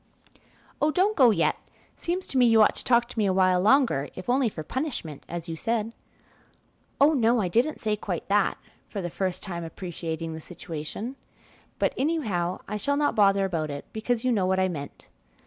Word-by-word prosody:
"Oh, 300 Hz, -, +4 dB
don't 385 Hz, +6 st, +2 dB
go 255 Hz, -5 st, +6 dB
yet; 175 Hz, -7 st, +2 dB, 0.4 s
seems 360 Hz, +2 st, -3 dB
to 265 Hz, -, -1 dB
me 245 Hz, -, +6 dB
you 225 Hz, -1 st, +6 dB
ought -, -, +4 dB
to -, -, -6 dB
talk 240 Hz, -1 st, +3 dB
to 235 Hz, -, -5 dB
me 205 Hz, -, +3 dB
a 190 Hz, -, +2 dB
while 185 Hz, -1 st, +3 dB
longer, 220 Hz, -, +3 dB
if 185 Hz, +6 st, -3 dB
only 255 Hz, -2 st, +3 dB
for 160 Hz, -6 st, -7 dB
punishment, 245 Hz, -, -4 dB
as 170 Hz, 0 st, -5 dB
you 165 Hz, -, -4 dB
said." 225 Hz, +5 st, -2 dB, 1.1 s
"Oh, 290 Hz, +3 st, +6 dB
no, 235 Hz, -3 st, +3 dB
I 195 Hz, -, +1 dB
didn't 240 Hz, -, +1 dB
say 215 Hz, -1 st, 0 dB
quite 195 Hz, -4 st, -4 dB
that," 205 Hz, 0 st, +2 dB, 0.3 s
for 205 Hz, -, -5 dB
the 175 Hz, -3 st, -4 dB
first 185 Hz, -1 st, -2 dB
time 170 Hz, -3 st, -5 dB
appreciating 165 Hz, -1 st, -5 dB
the 160 Hz, -, -7 dB
situation; 180 Hz, -, -6 dB, 0.6 s
"but -, -, +1 dB
anyhow 215 Hz, -, -1 dB
I 210 Hz, -, -3 dB
shall 285 Hz, +6 st, 0 dB
not 295 Hz, 0 st, +2 dB
bother 195 Hz, -2 st, +4 dB
about 165 Hz, -5 st, -2 dB
it, 140 Hz, 0 st, -6 dB
because 230 Hz, +2 st, -1 dB
you 255 Hz, -, +3 dB
know 195 Hz, -5 st, +1 dB
what 190 Hz, 0 st, +2 dB
I 185 Hz, -, +3 dB
meant." 145 Hz, -6 st, -7 dB
205 Hz, 200 wpm, -26 LUFS, 175-245 Hz, 1.1 s, go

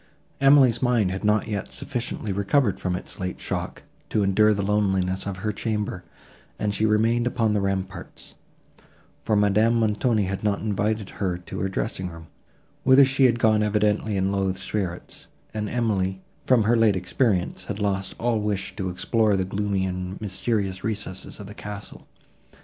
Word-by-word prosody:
Emily's 135 Hz, -4 st, +5 dB
mind 120 Hz, -7 st, +2 dB
had 95 Hz, +2 st, -4 dB
not 105 Hz, +1 st, +2 dB
yet 105 Hz, -3 st, -3 dB
sufficiently 120 Hz, -5 st, -4 dB
recovered 100 Hz, +2 st, +1 dB
from 90 Hz, -1 st, -1 dB
its -, -, -8 dB
late 90 Hz, -1 st, -4 dB
shock, -, -, -4 dB, 0.3 s
to 105 Hz, -, +1 dB
endure 105 Hz, +2 st, +4 dB
the 100 Hz, -1 st, 0 dB
loneliness 95 Hz, -2 st, 0 dB
of 100 Hz, -2 st, -4 dB
her 105 Hz, -, +1 dB
chamber, 105 Hz, -4 st, -3 dB, 0.5 s
and 105 Hz, -1 st, -1 dB
she 110 Hz, +1 st, +1 dB
remained 115 Hz, +3 st, +2 dB
upon 115 Hz, -3 st, +1 dB
the 105 Hz, -, +1 dB
ramparts; 95 Hz, -2 st, -4 dB, 0.9 s
for 110 Hz, -, +1 dB
Madame 105 Hz, +3 st, +3 dB
Montoni 110 Hz, 0 st, +2 dB
had 95 Hz, +1 st, -3 dB
not 105 Hz, -1 st, +1 dB
invited 105 Hz, 0 st, -1 dB
her 90 Hz, -3 st, 0 dB
to 90 Hz, -, -8 dB
her 95 Hz, -, -1 dB
dressing 95 Hz, -1 st, -2 dB
room, 80 Hz, -1 st, -12 dB, 0.5 s
whither 135 Hz, +1 st, +7 dB
she 135 Hz, 0 st, +3 dB
had 120 Hz, -2 st, +4 dB
gone 110 Hz, -2 st, +3 dB
evidently 105 Hz, 0 st, +1 dB
in 95 Hz, +1 st, +1 dB
low 95 Hz, -1 st, +1 dB
spirits, 95 Hz, -2 st, -5 dB, 0.3 s
and 105 Hz, -1 st, -3 dB
Emily, 100 Hz, -6 st, 0 dB, 0.3 s
from 125 Hz, -4 st, +5 dB
her 115 Hz, +3 st, +3 dB
late 115 Hz, -3 st, +4 dB
experience, 90 Hz, +1 st, 0 dB
had 105 Hz, -, -4 dB
lost 100 Hz, -2 st, -1 dB
all 115 Hz, -1 st, 0 dB
wish 105 Hz, -2 st, -2 dB
to 95 Hz, -3 st, -2 dB
explore 105 Hz, +3 st, +1 dB
the 95 Hz, -, 0 dB
gloomy 100 Hz, 0 st, -1 dB
and 90 Hz, 0 st, -4 dB
mysterious 100 Hz, -2 st, -2 dB
recesses 100 Hz, -4 st, -4 dB
of 105 Hz, -, -7 dB
the 100 Hz, -, -9 dB
castle. 105 Hz, -1 st, -9 dB
105 Hz, 165 wpm, -24 LUFS, 95-110 Hz, 0.9 s, whither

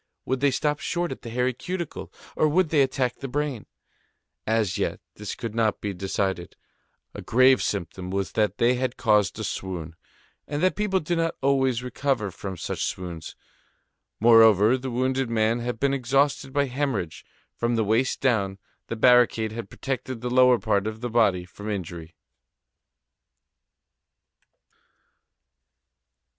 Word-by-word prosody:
Would 130 Hz, 0 st, -1 dB
they 140 Hz, +1 st, +3 dB
stop 150 Hz, +3 st, 0 dB
short 175 Hz, 0 st, -2 dB
at -, -, -7 dB
the 115 Hz, -, -8 dB
hairy 125 Hz, +2 st, 0 dB
cuticle, 170 Hz, +5 st, -5 dB, 0.2 s
or 155 Hz, -, +3 dB
would 165 Hz, +2 st, +2 dB
they 150 Hz, -2 st, +3 dB
attack 130 Hz, -2 st, 0 dB
the 135 Hz, -, -5 dB
brain? 140 Hz, -4 st, -3 dB, 0.8 s
As 110 Hz, -4 st, +1 dB
yet, -, -, -1 dB
this 105 Hz, -1 st, -6 dB
could 115 Hz, -3 st, -5 dB
not 110 Hz, -2 st, +1 dB
be 100 Hz, -1 st, -3 dB
decided. 95 Hz, -1 st, -2 dB, 0.6 s
A -, -, -7 dB
grave 130 Hz, +2 st, +4 dB
symptom 90 Hz, -1 st, -3 dB
was 95 Hz, 0 st, -2 dB
that 105 Hz, -1 st, 0 dB
they 120 Hz, +1 st, +3 dB
had 125 Hz, 0 st, -2 dB
caused 105 Hz, -3 st, +2 dB
a 110 Hz, -, -4 dB
swoon, 90 Hz, -5 st, -5 dB, 0.5 s
and 145 Hz, +3 st, -3 dB
that 185 Hz, -, +3 dB
people 200 Hz, -3 st, 0 dB
do 170 Hz, +3 st, -1 dB
not 165 Hz, 0 st, 0 dB
always 130 Hz, -3 st, +2 dB
recover 125 Hz, -4 st, -1 dB
from 95 Hz, 0 st, -7 dB
such -, -, -3 dB
swoons. 85 Hz, -3 st, -5 dB, 0.8 s
Moreover, 110 Hz, -1 st, +6 dB
the 130 Hz, 0 st, -4 dB
wounded 130 Hz, +1 st, 0 dB
man 115 Hz, +1 st, +1 dB
had 120 Hz, -1 st, -4 dB
been 140 Hz, 0 st, +1 dB
exhausted 135 Hz, +1 st, +1 dB
by 140 Hz, +1 st, +1 dB
hemorrhage. 125 Hz, -, -3 dB, 0.3 s
From 120 Hz, 0 st, 0 dB
the 115 Hz, -, +2 dB
waist 115 Hz, +5 st, +1 dB
down, 100 Hz, -7 st, +1 dB, 0.3 s
the -, -, -4 dB
barricade 120 Hz, -2 st, +4 dB
had 110 Hz, -3 st, -6 dB
protected 130 Hz, -1 st, -4 dB
the 125 Hz, 0 st, -3 dB
lower 125 Hz, -1 st, +6 dB
part 105 Hz, -3 st, 0 dB
of 110 Hz, +1 st, -5 dB
the 120 Hz, -1 st, -3 dB
body 100 Hz, -6 st, +2 dB
from 105 Hz, +4 st, -9 dB
injury. 85 Hz, -4 st, -6 dB
120 Hz, 150 wpm, -25 LUFS, 105-135 Hz, 0.8 s, Moreover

